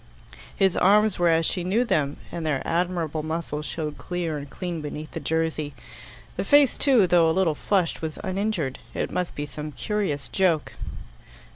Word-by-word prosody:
His 190 -2 +3
arms 210 +1 +4
were 175 -1 +4
as 165 0 +3
she 180 - 0
knew 200 +7 +2
them, 145 - 0
and 170 - -4
their 150 -4 0
admirable 170 -3 0
muscles 155 -1 -3
showed 150 -2 -4
clear 175 -3 -3
and 145 -1 -6
clean 175 0 -4
beneath 150 +1 -6
the 165 - -4
jersey. 155 -1 -1 0.6
The - - 0
face, 285 -3 +5
too, 255 -8 +4
though 170 -2 +4
a 160 - 0
little 180 -5 +3
flushed, 180 +2 0
was 160 -1 -4
uninjured: 190 -7 -1 0.2
it - - -2
must 180 -1 -2
be 145 - -3
some 150 +1 -6
curious 145 - -2
joke. 175 -6 +1
165 Hz, 170 wpm, -25 LUFS, 150-185 Hz, 0.6 s, face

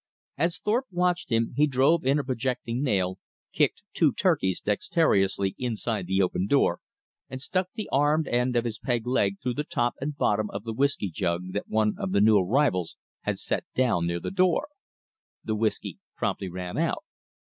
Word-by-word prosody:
As 165 +3 0
Thorpe 240 +8 0
watched 180 -2 0
him, 115 -1 +1
he 150 +1 +4
drove 140 +3 +3
in 140 +2 +4
a 145 - 0
projecting 125 -1 -2
nail, 95 -9 0 0.3
kicked - - +1
two - - +3
"turkeys" 95 -1 +1
dexterously 100 - +1
inside 115 -5 -2
the 95 +1 +2
open 90 +1 -1
door, 105 -9 +3 0.5
and 130 - -6
stuck 185 +7 -1
the 215 -2 -4
armed 145 +3 +2
end 125 +1 +1
of 120 0 +2
his 115 -2 -4
peg 120 -3 -1
leg 100 -6 +1
through 125 -1 0
the 150 - -2
top 120 -5 0
and 145 +1 -3
bottom 105 -4 +1
of 100 - -6
the 115 -1 -4
whisky 135 -6 0
jug 90 0 -2
that - - -3
one 110 -1 +2
of 95 - -2
the 100 - +4
new 105 -1 +6
arrivals 95 - +1 0.3
had - - -1
set - - -2
down 115 -10 +2
near 85 0 -1
the - - -5
door. 185 - +2 0.7
The 110 - -2
whisky 110 0 -1 0.2
promptly 95 - -2
ran 90 - -5
out. 165 - 0
120 Hz, 180 wpm, -27 LUFS, 100-145 Hz, 0.7 s, new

